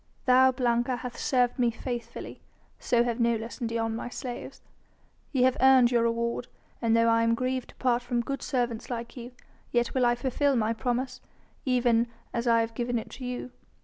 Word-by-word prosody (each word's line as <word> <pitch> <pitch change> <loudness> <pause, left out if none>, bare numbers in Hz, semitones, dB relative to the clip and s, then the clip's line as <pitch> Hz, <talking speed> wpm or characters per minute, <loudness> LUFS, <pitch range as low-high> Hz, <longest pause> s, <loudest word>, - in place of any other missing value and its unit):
"Thou, 260 +1 +6
Blanca, 245 0 +1
hath 245 0 -6
served 250 0 +1
me 240 -1 +4
faithfully, 240 +1 -6 0.4
so 240 -1 +2
have 240 0 -2
Nolus 235 0 0
and 235 -3 -2
Dion, 225 -1 -1
my 240 - -5
slaves. 245 -1 -7 0.7
Ye 260 -3 +2
have 255 0 +3
earned 260 -2 +6
your 240 -1 +3
reward, 235 +1 -1 0.3
and 230 -1 +3
though 230 0 +4
I 230 0 +4
am 230 0 +3
grieved 255 +1 -2
to - - -15
part 245 -1 +1
from 245 -1 -1
good 275 +2 -4
servants 240 -3 -2
like 235 -1 -5
you, 245 0 -8 0.4
yet 240 0 +1
will 255 -2 +3
I 240 - +3
fulfil 270 +2 +1
my 225 -1 +1
promise, 250 +2 -2 0.4
even 240 -2 +3 0.3
as 235 +1 -2
I 230 -1 +5
have 225 0 -3
given 240 +1 -1
it 225 - -6
to 255 - -8
you. 250 0 -5
240 Hz, 190 wpm, -28 LUFS, 235-255 Hz, 0.7 s, Thou